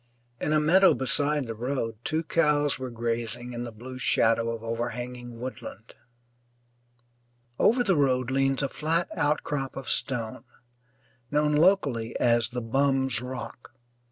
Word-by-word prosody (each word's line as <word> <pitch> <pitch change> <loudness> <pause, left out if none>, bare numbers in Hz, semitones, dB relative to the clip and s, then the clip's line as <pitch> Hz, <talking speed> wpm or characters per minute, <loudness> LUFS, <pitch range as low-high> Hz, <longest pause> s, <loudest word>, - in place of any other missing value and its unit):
In 150 - -1
a 155 - +4
meadow 185 +6 +5
beside 145 +2 0
the 115 - -4
road 115 -1 -3
two 160 +1 -1
cows 150 -4 +2
were 130 -1 -4
grazing 120 0 -3
in 120 0 -4
the 120 - -7
blue 130 +4 -9
shadow 115 -1 +2
of 115 -1 -5
overhanging 120 +1 -5
woodland. 125 -2 -8 1.7
Over 245 +3 +4
the 195 -6 +2
road 130 -3 +1
leans 135 +1 +1
a - - +1
flat 165 +5 -1
outcrop 145 -3 -1
of 135 - -3
stone, 115 -4 -2 0.9
known 150 +1 +2
locally 150 - +2
as 120 -1 +3
"The 125 -1 -4
Bum's 135 0 +1
Rock." 125 -1 -8
130 Hz, 135 wpm, -27 LUFS, 120-145 Hz, 1.7 s, meadow